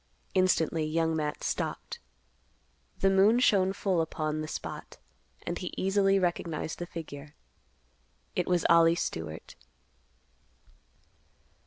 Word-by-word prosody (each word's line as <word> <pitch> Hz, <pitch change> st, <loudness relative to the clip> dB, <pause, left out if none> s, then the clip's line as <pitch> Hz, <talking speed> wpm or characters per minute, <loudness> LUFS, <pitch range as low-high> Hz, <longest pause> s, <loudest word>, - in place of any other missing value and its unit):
Instantly 170 Hz, -4 st, +2 dB
Young 160 Hz, +1 st, 0 dB
Matt 150 Hz, -1 st, -2 dB
stopped. -, -, -3 dB, 1.0 s
The 195 Hz, -, +5 dB
moon 200 Hz, +5 st, +5 dB
shone 195 Hz, -6 st, +4 dB
full 190 Hz, -3 st, 0 dB
upon 155 Hz, -1 st, -2 dB
the 155 Hz, -, -4 dB
spot, -, -, -7 dB, 0.5 s
and 175 Hz, -, -3 dB
he 180 Hz, -, -5 dB
easily 195 Hz, 0 st, +3 dB
recognized 170 Hz, -4 st, -2 dB
the 175 Hz, -, -4 dB
figure. 150 Hz, -3 st, -8 dB, 1.0 s
It -, -, 0 dB
was 175 Hz, -2 st, +1 dB
Ollie 170 Hz, 0 st, +6 dB
Stewart. 80 Hz, -, -5 dB
170 Hz, 110 wpm, -29 LUFS, 155-190 Hz, 1.0 s, Ollie